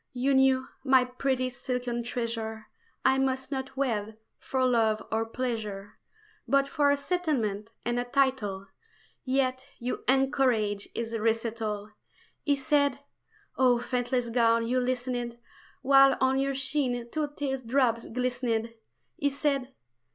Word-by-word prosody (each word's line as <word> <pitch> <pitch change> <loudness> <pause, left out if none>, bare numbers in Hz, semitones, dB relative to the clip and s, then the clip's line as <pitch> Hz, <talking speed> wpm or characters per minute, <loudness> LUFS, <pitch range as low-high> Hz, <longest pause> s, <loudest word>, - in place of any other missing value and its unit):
You 260 +2 +1
knew, 265 0 +4 0.2
my 260 -2 +5
pretty 255 0 -1
silken 245 -1 -3
treasure, 230 -2 -4 0.4
I 265 0 +4
must 265 0 -1
not 265 -1 -4
wed 220 -5 -1 0.2
for 260 -1 0
love 225 -3 +2
or 225 0 0
pleasure, 220 -4 -4 0.5
But 275 0 +3
for 285 0 +2
a 285 - +3
settlement 275 - -1
and 240 0 0
title; 250 -8 +1 0.6
Yet 260 0 0
you 245 +1 -4
encouraged 255 -6 +2
his 230 0 -3
recital! 220 -2 -1 0.5
He 285 - +2
said 285 -1 +2 0.6
oh, 250 -2 +5
faithless 245 0 -1
gown, 230 -1 +3
you 250 +2 +1
listened 245 -1 -2 0.5
While 275 0 +6
on 265 0 +2
your 275 0 0
sheen 260 -3 0
two 310 -1 -1
tear 270 -2 -1
drops 240 -2 +1
glistened 240 -2 -1 0.4
He 285 - +1
said 275 -2 -1
255 Hz, 125 wpm, -28 LUFS, 230-270 Hz, 0.6 s, While